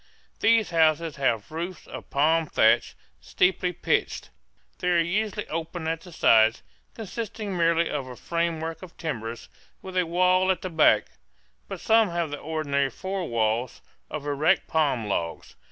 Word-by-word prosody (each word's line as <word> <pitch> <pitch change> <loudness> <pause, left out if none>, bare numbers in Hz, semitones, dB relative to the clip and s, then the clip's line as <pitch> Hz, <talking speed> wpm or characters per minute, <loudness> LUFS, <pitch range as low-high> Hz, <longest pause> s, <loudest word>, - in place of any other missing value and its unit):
These 225 -1 +3
houses 160 -1 +2
have 120 -5 0
roofs 170 +3 -5
of - - -10
palm 160 +3 +2
thatch, 110 -4 +3 0.2
steeply 180 0 +1
pitched. 175 - -1 0.5
They 180 - -3
are 175 -1 +3
usually 205 +5 -1
open 165 +1 -4
at 165 0 -2
the 180 - -13
sides, 115 -7 +4 0.3
consisting 215 -1 -5
merely 170 -1 +2
of 140 -3 -3
a 125 - -8
framework 165 +1 -3
of 185 -2 -12
timbers, 115 -8 -5 0.4
with 190 -1 -8
a 180 -2 +1
wall 185 +2 +3
at 185 -2 0
the 185 - -4
back; 160 -2 +4 0.6
but 195 - -6
some 225 -2 +4
have 170 -3 -2
the 145 - -5
ordinary 145 -3 -1
four 190 +5 -4
walls, 115 +1 -1 0.3
of 150 -2 -6
erect 150 +5 +1
palm 145 -8 +1
logs. 85 -5 -3
165 Hz, 155 wpm, -26 LUFS, 145-185 Hz, 0.6 s, sides